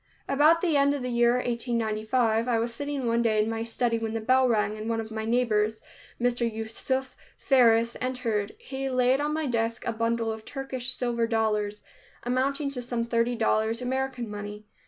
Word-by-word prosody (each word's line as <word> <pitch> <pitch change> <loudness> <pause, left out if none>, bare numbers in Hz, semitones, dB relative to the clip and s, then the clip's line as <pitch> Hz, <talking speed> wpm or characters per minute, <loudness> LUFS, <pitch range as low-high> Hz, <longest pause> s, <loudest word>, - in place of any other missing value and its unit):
About 305 +4 +4
the 335 -5 +1
end 280 0 +4
of 275 - -4
the 250 - -2
year 235 0 +4
1895, 230 -1 0
I 240 -2 +2
was 230 +1 -1
sitting 285 +1 -3
one 230 0 +2
evening 220 -2 +2
in 220 - -2
my 225 0 -3
study 230 0 0
when 225 0 -3
the - - 0
bell 255 +3 +3
rang, 210 -2 +1
and 215 +1 -5
one 225 0 0
of 225 0 -5
my 220 0 -3
neighbors, 220 -2 +1 0.4
Mr. 240 -1 +1
Yusuf 230 +4 -3 0.2
Faris, 235 -3 +4
entered. 235 -5 -2
He 270 0 -5
laid 255 +1 +2
on 295 +1 0
my 310 0 -1
desk 230 -3 -1
a - - -1
bundle 230 0 0
of 220 0 -7
Turkish 260 -1 -4
silver 235 -2 0
dollars, 210 -2 0 0.4
amounting 275 +3 0
to 250 -3 -5
some 240 -1 -2
thirty 235 +1 +1
dollars 225 0 +1
American 255 -1 -2
money. 210 0 -7
235 Hz, 185 wpm, -27 LUFS, 225-255 Hz, 0.4 s, About